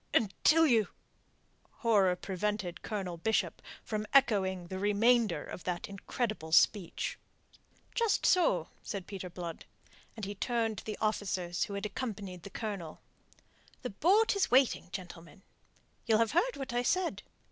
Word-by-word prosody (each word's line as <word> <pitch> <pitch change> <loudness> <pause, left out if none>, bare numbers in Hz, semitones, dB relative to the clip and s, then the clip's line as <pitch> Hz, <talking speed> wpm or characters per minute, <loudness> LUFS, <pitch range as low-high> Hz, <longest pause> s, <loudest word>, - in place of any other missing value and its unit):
"Until 305 +10 +4
you..." 225 - +4 0.9
Horror 200 -6 +4
prevented 190 -1 -3
Colonel 190 -5 -4
Bishop 220 +6 0 0.2
from 215 -1 -3
echoing 190 -9 +3
the 185 +2 -5
remainder 210 -3 +3
of - - -8
that 175 -1 -2
incredible 200 -3 -4
speech. 185 +1 +2 0.7
"Just 460 -3 +1
so," 255 - +3
said 195 -3 -5
Peter 190 -2 -6
Blood, 170 -2 -7 0.5
and 220 -3 -5
he 200 - -4
turned 225 0 -1
to - - -13
the 215 - -4
officers 190 -5 -1
who 200 - -6
had 200 +1 -3
accompanied 205 -5 -5
the 200 - -9
Colonel. 195 -7 -5 0.8
"The 250 - -3
boat 400 - +3
is 400 - +1
waiting, 255 -7 +3
gentlemen. 180 0 -9 0.6
You'll 220 -2 +5
have 230 0 +2
heard 460 +10 +1
what 270 -3 -5
I 245 - +2
said. 360 +7 0
205 Hz, 140 wpm, -32 LUFS, 185-235 Hz, 0.9 s, You'll